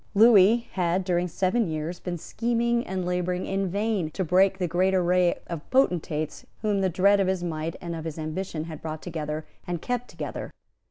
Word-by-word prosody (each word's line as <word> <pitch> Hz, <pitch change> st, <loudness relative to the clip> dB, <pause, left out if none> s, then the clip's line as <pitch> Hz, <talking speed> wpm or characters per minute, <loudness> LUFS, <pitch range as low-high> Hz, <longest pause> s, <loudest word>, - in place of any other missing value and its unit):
Lewis 220 Hz, +1 st, +7 dB
had, 180 Hz, 0 st, 0 dB
during 180 Hz, -1 st, +1 dB
seven 190 Hz, +5 st, +1 dB
years, 160 Hz, +2 st, -3 dB
been 175 Hz, -1 st, -4 dB
scheming 235 Hz, +5 st, 0 dB
and 185 Hz, -1 st, -2 dB
labouring 180 Hz, 0 st, -1 dB
in 195 Hz, 0 st, -1 dB
vain 200 Hz, -3 st, 0 dB
to 190 Hz, +5 st, -2 dB
break 190 Hz, +3 st, +3 dB
the 180 Hz, -2 st, -1 dB
great 185 Hz, +3 st, +2 dB
array 180 Hz, -1 st, +3 dB
of 165 Hz, -3 st, -7 dB
potentates 175 Hz, -, +1 dB, 0.2 s
whom 205 Hz, -2 st, +1 dB
the 190 Hz, -, +2 dB
dread 200 Hz, +3 st, +4 dB
of 195 Hz, -, +2 dB
his 185 Hz, -2 st, 0 dB
might 160 Hz, -1 st, -3 dB
and 170 Hz, -1 st, -5 dB
of 160 Hz, -1 st, -6 dB
his 160 Hz, -1 st, -5 dB
ambition 155 Hz, +1 st, -3 dB
had 160 Hz, -2 st, -8 dB
brought 155 Hz, -1 st, -5 dB
together 155 Hz, -2 st, -4 dB, 0.2 s
and 175 Hz, -1 st, -2 dB
kept 245 Hz, +6 st, -2 dB
together. -, -, -6 dB
180 Hz, 185 wpm, -26 LUFS, 165-195 Hz, 0.2 s, Lewis